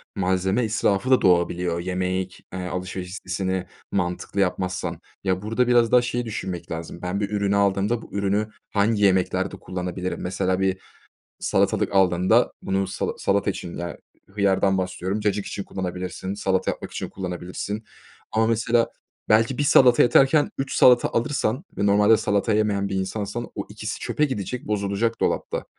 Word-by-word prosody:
malzeme 95 Hz, +3 st, +1 dB
israfı 110 Hz, +1 st, +1 dB
da 130 Hz, -, +5 dB
doğabiliyor 85 Hz, -1 st, +2 dB
yemek 90 Hz, +1 st, -3 dB
alışveriş 90 Hz, 0 st, -4 dB
listesini 95 Hz, -1 st, -3 dB, 0.2 s
mantıklı 90 Hz, +1 st, -2 dB
yapmazsan. 90 Hz, -2 st, -1 dB, 0.2 s
Ya, 95 Hz, -1 st, 0 dB
burada 115 Hz, +4 st, 0 dB
biraz 120 Hz, -2 st, +4 dB
daha 125 Hz, -, +6 dB
şeyi 120 Hz, 0 st, -2 dB
düşünmek 90 Hz, -6 st, -5 dB
lazım 85 Hz, +1 st, -6 dB
ben 90 Hz, +2 st, -2 dB
bir 100 Hz, -1 st, -1 dB
ürünü 100 Hz, -1 st, 0 dB
aldığımda 100 Hz, +3 st, +1 dB
bu -, -, -14 dB
ürünü 100 Hz, +1 st, 0 dB, 0.2 s
hangi 105 Hz, +1 st, +1 dB
yemeklerde 95 Hz, 0 st, +2 dB
kullanabilirim? 90 Hz, 0 st, -4 dB
Mesela 95 Hz, 0 st, -1 dB
bir 95 Hz, -1 st, +1 dB, 0.6 s
salatalık -, -, +1 dB
aldığında 90 Hz, -1 st, +3 dB
bunu 95 Hz, 0 st, 0 dB
sala 95 Hz, -, -2 dB
salata 100 Hz, 0 st, +1 dB
için, 90 Hz, -2 st, -6 dB
ya, 85 Hz, 0 st, -5 dB, 0.3 s
hıyardan 95 Hz, -1 st, +2 dB
bahsediyorum, 95 Hz, +2 st, -2 dB
cacık 105 Hz, -1 st, 0 dB
için 100 Hz, -, -5 dB
kullanabilirsin, 95 Hz, +1 st, -4 dB
salata 95 Hz, -2 st, 0 dB
yapmak -, -, -6 dB
için -, -, -4 dB
kullanabilirsin 90 Hz, +4 st, -5 dB, 0.5 s
ama 110 Hz, 0 st, +3 dB
mesela 115 Hz, +1 st, +2 dB, 0.4 s
belki 115 Hz, +4 st, +3 dB
1 -, -, +2 dB
salata 130 Hz, -4 st, +6 dB
yeterken 135 Hz, +4 st, +4 dB
3 135 Hz, 0 st, -2 dB
salata 125 Hz, -1 st, +6 dB
alırsan 125 Hz, -, -1 dB
ve 100 Hz, -, +2 dB
normalde 105 Hz, +2 st, +5 dB
salata 100 Hz, +1 st, 0 dB
yemeyen 105 Hz, -2 st, +1 dB
bir -, -, -3 dB
insansan 105 Hz, +4 st, -3 dB
o 100 Hz, -, -4 dB
ikisi 110 Hz, +1 st, -6 dB
çöpe 150 Hz, -, 0 dB
gidecek 125 Hz, -3 st, -3 dB
bozulacak 105 Hz, +2 st, -1 dB
dolapta. -, -, -1 dB
100 Hz, 150 wpm, -24 LUFS, 95-110 Hz, 0.6 s, daha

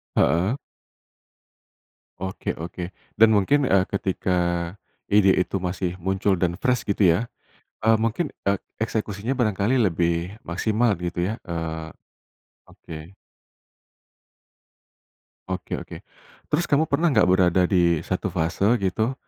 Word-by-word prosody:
Heeh. 90 Hz, +9 st, +3 dB, 1.6 s
Oke 95 Hz, +1 st, -4 dB
oke, 85 Hz, +2 st, -7 dB, 0.2 s
dan 115 Hz, -, +8 dB
mungkin, 135 Hz, +8 st, +3 dB
eee, 95 Hz, -4 st, +4 dB
ketika, 95 Hz, -1 st, -1 dB, 0.8 s
ide 100 Hz, -2 st, +5 dB
itu 95 Hz, +1 st, 0 dB
masih 90 Hz, 0 st, -3 dB
muncul 95 Hz, +1 st, 0 dB
dan 85 Hz, -1 st, +1 dB
fresh 125 Hz, +5 st, 0 dB
gitu 100 Hz, 0 st, +1 dB
ya, 110 Hz, +8 st, 0 dB, 0.5 s
eee, 110 Hz, +1 st, +4 dB
mungkin 115 Hz, +9 st, -1 dB, 0.2 s
ek 100 Hz, -1 st, +1 dB, 0.2 s
eksekusinya 110 Hz, +1 st, -3 dB
barangkali 115 Hz, 0 st, +1 dB
lebih 85 Hz, -1 st, 0 dB
maksimal 110 Hz, +6 st, +1 dB
gitu 85 Hz, 0 st, -2 dB
ya? 110 Hz, +5 st, -3 dB
Eee, 80 Hz, -1 st, -4 dB, 0.8 s
oke. 80 Hz, -2 st, -11 dB, 2.5 s
Oke 95 Hz, -1 st, -3 dB
oke. -, -, -9 dB, 0.5 s
Terus 175 Hz, -, +1 dB
kamu 150 Hz, +2 st, +2 dB
pernah 155 Hz, +2 st, +2 dB
nggak 105 Hz, -6 st, +4 dB
berada 90 Hz, -1 st, +4 dB
di 85 Hz, -4 st, +3 dB
1 -, -, -3 dB
fase 80 Hz, +4 st, 0 dB, 0.2 s
gitu, 110 Hz, +6 st, 0 dB
95 Hz, 115 wpm, -24 LUFS, 90-110 Hz, 2.5 s, dan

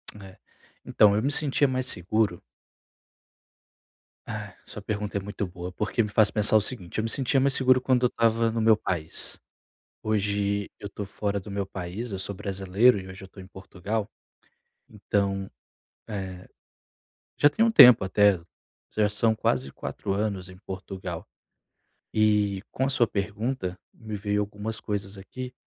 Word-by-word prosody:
É, 95 Hz, -2 st, -13 dB, 0.5 s
então 105 Hz, -1 st, +4 dB
eu 105 Hz, -, +1 dB
me 140 Hz, +3 st, 0 dB
sentia 145 Hz, -1 st, +6 dB
mais 130 Hz, -1 st, -2 dB
seguro. 95 Hz, -1 st, 0 dB, 1.8 s
Ah, -, -, -7 dB
sua -, -, -9 dB
pergunta 105 Hz, -1 st, -3 dB
é -, -, 0 dB
muito 100 Hz, 0 st, -4 dB
boa, 90 Hz, 0 st, -8 dB
porque 105 Hz, +5 st, -1 dB
me 105 Hz, -, -4 dB
faz 105 Hz, 0 st, +4 dB
pensar 105 Hz, 0 st, +4 dB
o -, -, +2 dB
seguinte, 100 Hz, -6 st, -3 dB
eu 110 Hz, -, 0 dB
me 115 Hz, -, -2 dB
sentia 135 Hz, +2 st, +2 dB
mais 135 Hz, 0 st, +2 dB
seguro 130 Hz, -1 st, +4 dB
quando 130 Hz, -1 st, +1 dB
eu -, -, +6 dB
estava 115 Hz, -1 st, +1 dB
no 115 Hz, -, -2 dB
meu 110 Hz, 0 st, +5 dB
país. 85 Hz, -6 st, -1 dB, 0.7 s
Hoje 100 Hz, -1 st, -1 dB
eu 100 Hz, -, -6 dB
estou 100 Hz, 0 st, -7 dB
fora 100 Hz, +1 st, -3 dB
do 100 Hz, +1 st, -10 dB
meu 100 Hz, -1 st, -2 dB
país, 95 Hz, +5 st, -6 dB
eu 95 Hz, -, -4 dB
sou 95 Hz, +1 st, -5 dB
brasileiro 100 Hz, +4 st, +2 dB
e 95 Hz, -, -10 dB
hoje 95 Hz, +1 st, -10 dB
eu -, -, -8 dB
estou 95 Hz, +1 st, -13 dB
em 95 Hz, -, -12 dB
Portugal. 100 Hz, +3 st, -5 dB, 0.8 s
Então, 100 Hz, -2 st, -2 dB, 0.6 s
eh, 95 Hz, -3 st, -6 dB, 0.9 s
já 145 Hz, -, +6 dB
tem 220 Hz, +10 st, +1 dB
um 230 Hz, -, +3 dB
tempo 125 Hz, -, +9 dB
até, 100 Hz, 0 st, +3 dB, 0.6 s
já 105 Hz, -1 st, +3 dB
são 110 Hz, +2 st, +2 dB
quase 70 Hz, -9 st, -1 dB
4 100 Hz, -, -5 dB
anos 100 Hz, -2 st, -2 dB
em 90 Hz, 0 st, -13 dB
Portugal. 95 Hz, -2 st, -7 dB, 0.9 s
E 105 Hz, -3 st, +2 dB
com 130 Hz, -, -1 dB
a 135 Hz, -, 0 dB
sua 125 Hz, -3 st, +2 dB
pergunta, 105 Hz, -1 st, -3 dB, 0.2 s
me 110 Hz, -3 st, -8 dB
veio 105 Hz, +1 st, -1 dB
algumas 105 Hz, +2 st, -5 dB
coisas 100 Hz, -1 st, -4 dB
aqui, 125 Hz, +6 st, -8 dB
105 Hz, 165 wpm, -26 LUFS, 95-110 Hz, 1.8 s, tempo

